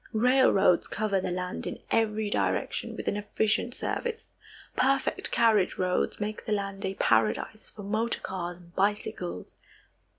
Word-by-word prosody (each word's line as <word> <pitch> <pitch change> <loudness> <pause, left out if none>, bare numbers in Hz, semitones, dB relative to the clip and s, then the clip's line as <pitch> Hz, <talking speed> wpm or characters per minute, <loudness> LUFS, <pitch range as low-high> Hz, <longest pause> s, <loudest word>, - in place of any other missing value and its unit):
Railroads 225 -6 +4
cover 205 -3 0
the - - -2
land 180 0 -3
in - - -4
every 215 -2 +1
direction - - -1
with - - -6
an 205 - +1
efficient 215 +3 0
service. 460 -1 -4 0.4
Perfect 270 +1 +1
carriage 220 -5 +3
roads 180 -1 0
make 210 +1 -3
the 215 - +1
land 200 -1 -3
a 190 0 -2
paradise 115 - +1
for 205 - -10
motor 220 +3 0
cars 175 -2 -4
and 175 -1 -18
bicycles. 200 - -2
205 Hz, 140 wpm, -28 LUFS, 185-220 Hz, 0.4 s, Railroads